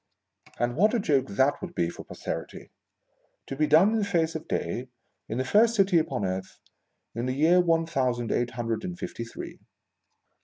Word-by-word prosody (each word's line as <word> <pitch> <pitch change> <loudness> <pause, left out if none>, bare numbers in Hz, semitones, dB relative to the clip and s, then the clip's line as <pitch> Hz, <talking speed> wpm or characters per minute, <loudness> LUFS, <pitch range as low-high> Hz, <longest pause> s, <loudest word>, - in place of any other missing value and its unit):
And 120 0 -1
what 210 - +3
a - - +2
joke 140 -9 +1
that 130 +8 +1
would 180 -2 -7
be 85 - +1
for - - -10
Posterity! - - -7 0.7
To 135 - -6
be 155 +2 +1
done 160 +8 +6
in 225 - +1
the - - 0
face 170 -5 0
of 160 - -6
day, 120 +9 -3 0.4
in 110 - -3
the 130 - -1
first 225 - +4
city 195 -4 +4
upon 155 -10 -2
earth, 95 0 -4 0.5
in. 120 +2 -3
the 130 - -1
year 165 +5 +4
one 165 -1 +2
thousand 125 -7 -1
eight 120 0 0
hundred 115 +1 -3
and 180 -1 -5
fifty 120 - -5
three 115 - -9
150 Hz, 190 wpm, -27 LUFS, 120-180 Hz, 0.7 s, done